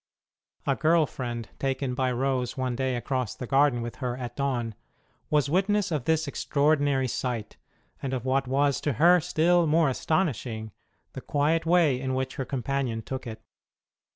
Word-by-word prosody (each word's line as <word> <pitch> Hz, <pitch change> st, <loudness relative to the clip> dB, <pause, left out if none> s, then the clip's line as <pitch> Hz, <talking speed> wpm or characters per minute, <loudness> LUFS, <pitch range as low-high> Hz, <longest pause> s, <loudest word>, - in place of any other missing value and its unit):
A -, -, +2 dB
girl 160 Hz, 0 st, +3 dB
friend, 120 Hz, -5 st, -5 dB
taken 135 Hz, -1 st, -1 dB
by 130 Hz, 0 st, 0 dB
Rose 130 Hz, 0 st, -1 dB
one 130 Hz, -2 st, -1 dB
day 130 Hz, 0 st, -1 dB
across 125 Hz, -2 st, -2 dB
the 125 Hz, -, -6 dB
garden 135 Hz, -2 st, +3 dB
with 120 Hz, -1 st, -6 dB
her 125 Hz, -2 st, -3 dB
at 125 Hz, -2 st, -6 dB
dawn... 125 Hz, -5 st, -1 dB, 0.6 s
was 150 Hz, -2 st, +2 dB
witness 195 Hz, +4 st, +1 dB
of 145 Hz, -6 st, -1 dB
this 160 Hz, -1 st, +1 dB
extraordinary 140 Hz, -2 st, +1 dB
sight, 120 Hz, -3 st, -3 dB, 0.4 s
and 135 Hz, -, -3 dB
of 130 Hz, -2 st, -3 dB
what 135 Hz, 0 st, +1 dB
was 140 Hz, +1 st, +1 dB
to 145 Hz, -, 0 dB
her 175 Hz, +6 st, +5 dB
still 175 Hz, +1 st, +2 dB
more 155 Hz, -1 st, +3 dB
astonishing, 125 Hz, -, -1 dB, 0.4 s
the -, -, -6 dB
quiet 155 Hz, +3 st, +1 dB
way 165 Hz, -7 st, +4 dB
in 130 Hz, -1 st, -1 dB
which 130 Hz, 0 st, -3 dB
her 135 Hz, -, -2 dB
companion 130 Hz, -3 st, -2 dB
took 130 Hz, +1 st, -5 dB
it. 110 Hz, -1 st, -8 dB
135 Hz, 165 wpm, -27 LUFS, 125-150 Hz, 0.6 s, her